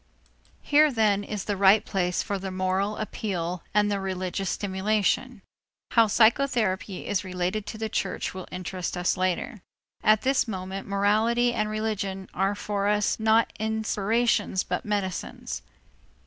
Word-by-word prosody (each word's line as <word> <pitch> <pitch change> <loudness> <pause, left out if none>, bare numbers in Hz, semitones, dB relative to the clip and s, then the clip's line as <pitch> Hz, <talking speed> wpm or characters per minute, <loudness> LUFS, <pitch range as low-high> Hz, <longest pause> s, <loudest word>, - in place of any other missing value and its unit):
Here 300 +1 +5
then 210 -4 +2
is 205 -1 -4
the 205 - -2
right 195 +2 +5
place 180 -2 0
for 200 -2 -3
the 190 0 -4
moral 185 +2 -1
appeal 180 -5 -3
and 205 0 +2
the 200 - 0
religious 190 0 -3
stimulation. 205 +3 0 0.5
How 230 -2 +5
psychotherapy 220 -4 +2
is 195 -2 -1
related 185 +3 -2
to 220 - -6
the 220 0 -2
church - - -2
will 185 -1 -7
interest 185 0 -4
us 175 0 +1
later. 185 +3 -2 0.4
At 215 0 +4
this 270 -1 +2
moment 190 -1 -5
morality 220 +5 +2
and 215 -2 -1
religion 205 -3 -3
are 195 +2 0
for 200 -1 -2
us 210 +1 +1
not 220 +1 +3
inspirations 220 -1 +1
but - - -3
medicines. 200 -3 -3
205 Hz, 140 wpm, -26 LUFS, 190-220 Hz, 0.5 s, Here